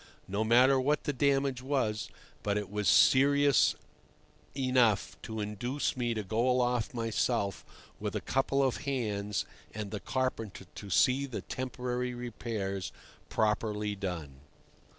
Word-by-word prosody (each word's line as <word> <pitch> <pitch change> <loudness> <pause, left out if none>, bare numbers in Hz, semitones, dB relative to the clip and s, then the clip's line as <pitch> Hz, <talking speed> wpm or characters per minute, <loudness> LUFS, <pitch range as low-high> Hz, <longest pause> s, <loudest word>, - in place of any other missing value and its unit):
No 100 +3 -1
matter 125 +4 +5
what 145 +3 +1
the 145 - -1
damage 135 -1 +1
was, 125 -7 -1 0.3
but 100 0 0
it 105 -2 -4
was 105 -1 -1
serious 140 0 +5 0.8
enough 125 -6 +2
to 110 -1 -6
induce 110 +7 -2
me 120 -2 -1
to 110 - -2
go 110 +6 +1
aloft 125 -1 +1
myself 115 -3 0 0.4
with - - -3
a - - +1
couple 135 +1 +1
of 130 -2 +1
hands 105 -8 -2 0.3
and 105 -2 -5
the 105 - -3
carpenter 115 -7 -3
to 100 - -9
see 135 +6 +3
the 125 - -5
temporary 125 -1 -3
repairs 110 -5 -4 0.4
properly 105 -1 0
done. 85 -9 -5
120 Hz, 130 wpm, -31 LUFS, 105-130 Hz, 0.8 s, matter